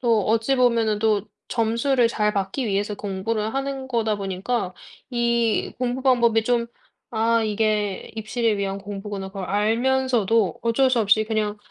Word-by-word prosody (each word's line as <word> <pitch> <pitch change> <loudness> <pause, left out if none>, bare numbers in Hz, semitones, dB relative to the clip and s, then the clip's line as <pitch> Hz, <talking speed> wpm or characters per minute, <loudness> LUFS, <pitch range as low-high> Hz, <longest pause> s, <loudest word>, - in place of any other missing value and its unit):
또 230 -4 +2
어찌 225 +4 +2
보면은 230 -4 +2
또 215 -2 +2 0.3
점수를 235 +2 +2
잘 210 -2 0
받기 200 +6 -2
위해서 205 0 -1
공부를 210 +3 -3
하는 270 -1 -3
거다 225 -4 0
보니까 195 +1 -3 0.4
이 235 -2 +1
공부 250 +1 -2
방법이 235 -4 +3
좀 235 0 +1 0.4
'아 230 0 +2
이게 215 -1 -1
입시를 220 0 0
위한 195 0 -2
공부구나.' 200 -1 -6
그걸 195 -1 -6
알면서도 225 -1 +1
어쩔 255 +3 +2
수 245 - +2
없이 215 +1 +3
그냥 215 -1 -1
225 Hz, 295 characters per minute, -23 LUFS, 205-240 Hz, 0.4 s, 방법이